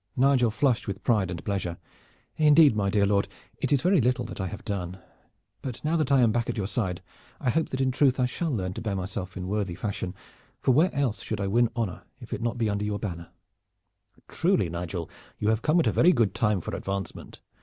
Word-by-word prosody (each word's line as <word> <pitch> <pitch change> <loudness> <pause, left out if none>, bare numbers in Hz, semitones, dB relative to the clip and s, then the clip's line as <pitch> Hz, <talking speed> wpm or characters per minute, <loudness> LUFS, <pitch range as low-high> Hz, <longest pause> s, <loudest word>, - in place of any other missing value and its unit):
Nigel 130 -2 +4
flushed 120 +2 +1
with 100 0 -5
pride 105 -6 +2
and 85 -2 -6
pleasure. 95 -4 -2 0.6
"Indeed, 150 -4 +6
my 100 -2 +1
dear 100 0 +3
lord, 100 0 +2 0.3
it - - -1
is 140 -3 +3
very 180 -3 +4
little 125 +1 +1
that 110 -3 -6
I 95 - -2
have 100 - -8
done. 95 -2 -3 0.6
But 130 -4 -5
now 160 +2 +1
that 155 -4 0
I 135 -2 +5
am 115 -2 +4
back 120 +1 -1
at - - -2
your 100 - -1
side 95 -4 -2 0.4
I 125 - +1
hope 160 +4 0
that 130 - -2
in 130 -1 +2
truth 130 0 +3
I 125 - +3
shall 160 +7 -2
learn 95 -9 -2
to - - -6
bear 105 -3 -2
myself 95 -1 -4
in 90 - -4
worthy 100 -3 -1
fashion, 100 -3 -4 0.4
for - - +2
where 160 +9 +4
else 135 -6 0
should 110 - -4
I 100 - -1
win 115 +4 +3
honor 115 -7 -2 0.2
if - - -8
it - - -4
be - - -4
not 120 -1 0
under 100 0 -1
your 105 -1 -1
banner." 85 -5 -5 1.0
"Truly, - - +1
Nigel, 85 -1 -4 0.3
you 105 - 0
have 110 0 +1
come 160 +3 +3
at 165 - +2
a - - +3
very 180 +2 +5
good 115 -6 +2
time 105 -4 +1
for - - -5
advancement. 95 -2 -5
110 Hz, 230 wpm, -27 LUFS, 95-130 Hz, 1.0 s, Indeed